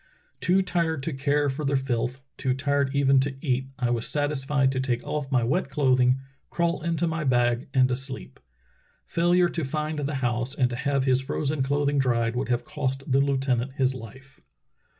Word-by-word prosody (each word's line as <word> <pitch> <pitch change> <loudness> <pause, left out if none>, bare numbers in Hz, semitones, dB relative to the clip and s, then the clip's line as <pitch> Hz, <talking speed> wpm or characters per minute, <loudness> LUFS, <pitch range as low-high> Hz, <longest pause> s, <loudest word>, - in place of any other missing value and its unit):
Too 190 +2 +3
tired 165 -5 -1
to 160 - -2
care 145 +2 +1
for 140 +2 -3
the 140 0 +1
filth, 130 -1 -1
too 130 -1 -1
tired 140 +1 +1
even 135 -1 +4
to 135 +1 -1
eat, 130 -2 -1
I 125 -2 0
was 115 -1 -1
satisfied 145 -2 +1
to 130 - -2
take 125 -2 -1
off 145 -2 -3
my 125 -3 +3
wet 140 +5 0
cloth 135 -2 +2
ing, 125 +1 +4 0.3
crawl 170 0 0
into 170 0 0
my 165 -1 -2
bag, 120 -2 +2
and 130 -1 +4
to 125 - 0
sleep." 130 - -7 0.7
Failure 175 +1 +3
to 170 -1 -3
find 150 +2 -2
the 145 0 -2
house 120 0 -1
and 125 -3 +1
to - - -2
have 140 0 0
his 130 -1 +3
frozen 140 +2 -2
clothing 140 +1 +1
dried 115 -3 +1
would 125 0 -2
have 120 -1 0
cost 135 0 -3
the 135 +1 +4
lieutenant 135 -2 0
his 130 -1 +1
Hfe. 130 +3 -11
135 Hz, 190 wpm, -26 LUFS, 130-145 Hz, 0.7 s, even